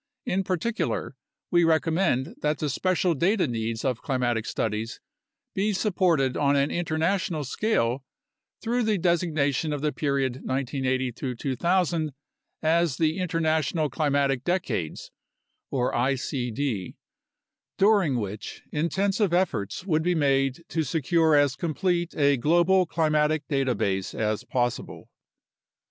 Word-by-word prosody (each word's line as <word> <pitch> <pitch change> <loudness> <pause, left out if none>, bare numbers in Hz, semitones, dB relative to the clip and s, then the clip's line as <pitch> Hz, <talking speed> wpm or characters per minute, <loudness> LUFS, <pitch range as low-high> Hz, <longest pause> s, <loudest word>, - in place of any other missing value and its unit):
In 195 +1 0
particular, 185 - -2 0.4
we 175 0 +4
recommend 160 -4 +1
that 150 0 +1
the 150 -2 -2
special 185 +4 +1
data 185 +6 +2
needs 115 -1 -3
of 125 -3 -1
climatic 120 -5 -1
studies 110 +1 -2 0.5
be 205 +2 0
supported 175 - +1
on 140 -1 +2
an 140 +1 +2
inter 170 -2 -2
national 170 -1 0
scale 135 - 0 0.6
through 240 +2 0
the 215 -3 +1
designation 160 -4 +1
of 145 -2 -3
the 150 0 +1
period 140 -4 -1
1980 130 -1 -2
2000 160 +4 0 0.5
as 165 -3 +2
the 160 +2 +1
International 160 -3 0
Climatic 140 -4 +1
Decades 135 - -2 0.6
(icd), 125 -3 -1 0.8
during 195 - +3
which 105 0 -6
intensive 190 +5 0
efforts 145 - 0
would 160 -5 +1
be 175 +2 +1
made 135 0 +1
to 165 - 0
secure 160 +2 +2
as 145 -2 +3
complete 175 +2 -1
a 140 -2 +4
global 175 +6 +3
climatic 155 -2 +1
data 135 -4 +1
base 95 -1 -1
as 110 -1 -1
possible. 120 -1 -3
150 Hz, 120 wpm, -26 LUFS, 130-175 Hz, 0.8 s, we